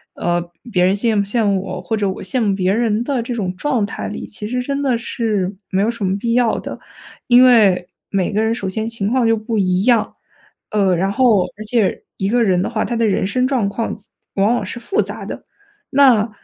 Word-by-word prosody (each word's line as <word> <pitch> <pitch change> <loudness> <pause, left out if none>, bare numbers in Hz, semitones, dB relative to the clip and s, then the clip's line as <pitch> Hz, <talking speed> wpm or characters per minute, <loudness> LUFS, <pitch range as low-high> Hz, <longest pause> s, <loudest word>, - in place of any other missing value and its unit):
呃， 175 0 -2 0.2
别 180 -4 +2
人 185 +1 +4
羡 220 +2 +1
慕 205 - +3
羡 215 +3 0
慕 195 -2 +1
我 195 - -5
或 225 - -2
者 205 -2 0
我 190 - -5
羡 255 - 0
慕 205 -3 +2
别 190 0 +1
人 225 0 +1
的 270 -3 -1
这 245 - -4
种 190 -6 -3
状 250 -1 0
态 200 - -5
里， - - -6
其 210 +1 -7
实 250 +3 -1
真 275 +2 -2
的 260 -4 +1
是 210 -4 -2
没 190 - +1
有 215 - +2
什 230 -4 -3
么 190 +1 0
必 230 +3 -1
要 240 -2 +2
的。 - - -7 0.5
因 245 +1 +7
为 205 -8 +4 0.2
每 195 -2 -1
个 210 - +1
人 220 +1 +1
首 205 -4 -4
先 220 +4 -2
情 225 -4 -3
况 250 0 +2
就 225 0 +3
不 220 +1 -3
一 185 -1 +1
样， 235 -2 +2 0.6
呃， 200 -3 +2
然 190 +3 0
后 220 -5 +3
而 215 - -7
且 215 -2 0
一 195 - -1
个 235 +3 +2
人 185 -4 +2
的 - - -1
话， 215 - -1
他 240 - -3
的 230 - +2
人 195 - +1
生 250 +6 +1
状 250 -7 0
况 225 +3 -3
及 210 - -18 0.2
往 200 +3 +2
往 240 - -1
是 185 - -6
复 235 - 0
杂 205 +1 -6
的。 - - -7 0.5
那， 250 -6 +5
215 Hz, 255 characters per minute, -19 LUFS, 195-235 Hz, 0.6 s, 因